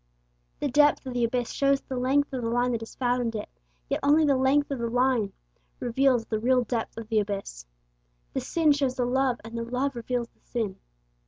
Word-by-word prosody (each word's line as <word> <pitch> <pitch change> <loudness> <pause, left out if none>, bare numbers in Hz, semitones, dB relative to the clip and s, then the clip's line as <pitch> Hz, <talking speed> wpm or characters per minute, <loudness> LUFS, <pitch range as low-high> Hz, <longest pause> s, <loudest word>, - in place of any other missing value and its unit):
The 290 - 0
depth 290 +1 +4
of 260 - -5
the 245 -1 0
abyss 240 +1 0
shows 275 0 +2
the 260 - -6
length 270 +3 +1
of 255 - -2
the 230 - -1
line 245 +1 +1
that 230 -2 -2
has 225 - -9
fathomed 245 -2 0
it, 210 - -4 0.4
yet - - -1
only 300 +2 +4
the 280 -2 +4
length 275 +2 +2
of 275 - -2
the 235 0 -1
line 245 -4 +2 0.5
reveals 250 -1 +2
the 220 -1 -2
real 250 +2 +3
depth 230 -1 -3
of 225 -1 -6
the 220 -2 +3
abyss. 195 - -4 0.7
The - - -1
sin 325 -3 +2
shows 275 -3 +1
the 250 - 0
love, 255 0 +1
and 225 +1 -8
the 230 - -2
love 255 +3 -2
reveals 235 0 -2
the - - -37
sin. 220 -6 -3
245 Hz, 215 wpm, -27 LUFS, 230-270 Hz, 0.7 s, depth